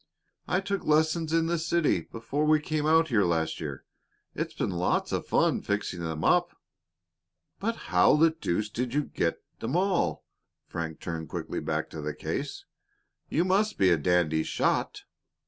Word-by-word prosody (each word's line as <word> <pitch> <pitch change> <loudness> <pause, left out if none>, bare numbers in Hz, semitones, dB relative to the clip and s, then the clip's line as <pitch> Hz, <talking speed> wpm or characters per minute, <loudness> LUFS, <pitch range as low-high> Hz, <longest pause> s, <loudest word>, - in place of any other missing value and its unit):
"I 180 +2 +1
took 200 0 -2
lessons 155 +1 +2
in 165 0 +3
the 170 0 0
city 165 - +1
before 115 - -3
we 155 0 +5
came 150 0 -1
out 160 0 +4
here 110 -5 +3
last 85 -2 0
year. 75 -4 -6 0.5
It's - - -4
been - - -1
lots 90 0 0
of - - -2
fun - - +2
fixing 100 -3 -2
them 80 -2 -4
up." - - +2 1.0
"But 225 +3 -1 0.2
how 90 +9 +6
the 160 +2 +5
deuce 105 - -2
did 125 +3 -3
you 150 - +2
get 85 - -2 0.2
'em 120 +7 -2
all?" 190 0 +1 0.4
Frank 80 -2 -5
turned 80 -2 -5
quickly - - -4
back - - -2
to 80 - -6
the 75 0 -4
case - - -4 0.6
again. - - -4
"You 170 - +4
must 205 +3 +2
be 95 -2 +4
a 85 - +4
dandy 80 -1 +2
shot." - - -1
130 Hz, 170 wpm, -28 LUFS, -, 1.0 s, how